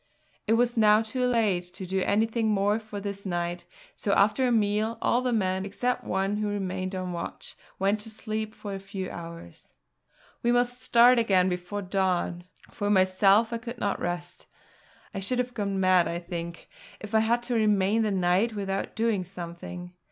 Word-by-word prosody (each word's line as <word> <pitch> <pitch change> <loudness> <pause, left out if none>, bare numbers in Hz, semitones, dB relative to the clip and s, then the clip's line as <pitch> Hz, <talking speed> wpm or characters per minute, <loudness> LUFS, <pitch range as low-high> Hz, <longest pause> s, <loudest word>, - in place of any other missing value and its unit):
It 220 - +4
was 240 +1 +2
now 215 0 +5
too 250 +3 -1
late 220 -7 +2
to 190 - -5
do 190 +1 -1
anything 220 +3 +1
more 205 0 +2
for 215 -2 -7
this 200 0 -5
night; 175 -1 -3 0.3
so, 200 - -1
after 215 +7 +3
a - - +1
meal, 215 0 +1
all 245 - +2
the 255 -1 0
men, 190 -4 0
except 245 +5 -2
one 195 +2 -1
who 210 0 -1
remained 190 -2 -3
on 185 -1 -3
watch, 170 - -5 0.2
went 200 +2 +1
to 210 - -7
sleep 220 0 -4
for 205 -2 -6
a 195 - -4
few 195 -1 -6
hours. 165 - -9 0.7
We 240 - +2
must 245 +1 +1
start 240 +1 +6
again 190 -5 +3
before 180 +3 -4
dawn. 180 -2 -1 0.3
For 205 - -2
myself 195 +3 +4
I 230 - -2
could 240 +1 -7
not 205 -3 -1
rest; 175 0 -4 0.7
I 195 - -3
should 225 +6 0
have 250 0 -1
gone 200 -4 -2
mad, 185 -2 +4
I 170 - -2
think, 170 -1 -6 0.3
if 210 0 -9
I 220 - +5
had 235 +2 +1
to 245 0 -2
remain 210 -1 +3
the 215 - +1
night 190 +4 +1
without 195 -1 -3
doing 220 -4 +1
something. 175 0 -8
205 Hz, 180 wpm, -27 LUFS, 185-225 Hz, 0.7 s, start